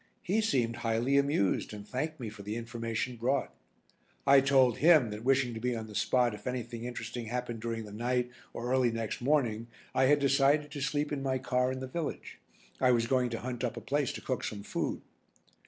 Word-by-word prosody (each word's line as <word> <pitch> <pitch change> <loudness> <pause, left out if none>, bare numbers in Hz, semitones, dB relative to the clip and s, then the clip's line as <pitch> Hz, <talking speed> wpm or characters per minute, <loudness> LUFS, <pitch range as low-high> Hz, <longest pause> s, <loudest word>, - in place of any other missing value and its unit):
He 205 +5 +1
seemed 120 - +1
highly 115 +4 +1
amused 140 -9 +1
and 105 0 -9
thanked 155 +4 -3
me 120 - -4
for 105 -1 -11
the 105 +2 -4
information 115 +1 -3
brought. 130 +5 0 0.7
I 140 0 +7
told 130 -3 +4
him 155 -8 +6
that 105 +1 -6
wishing 130 -1 +2
to 110 - -5
be 125 +1 -1
on 110 -1 -4
the 110 - -11
spot 120 +3 +2
if 105 +2 -9
anything 120 -2 -4
interesting 120 -1 -5
happened 120 -1 -3
during 115 0 -3
the 105 - -10
night 125 +3 -1 0.2
or 120 +1 -4
early 130 -2 +4
next 115 0 -3
morning 120 -5 +1 0.3
I 130 - +3
had 145 +2 +5
decided 140 +1 +3
to 145 -2 -5
sleep 145 +1 -1
in 145 -2 -2
my 135 -1 0
car 125 0 0
in 130 0 -4
the 130 - -4
village. 155 +3 -5 0.4
I 130 - +4
was 120 -2 +3
going 125 0 +2
to 115 -1 -4
hunt 125 0 -4
up 120 -1 -2
a - - -2
place 140 +4 0
to - - -7
cook 130 - -2
some 100 -2 -4
food. - - -3
125 Hz, 210 wpm, -31 LUFS, 115-135 Hz, 0.7 s, I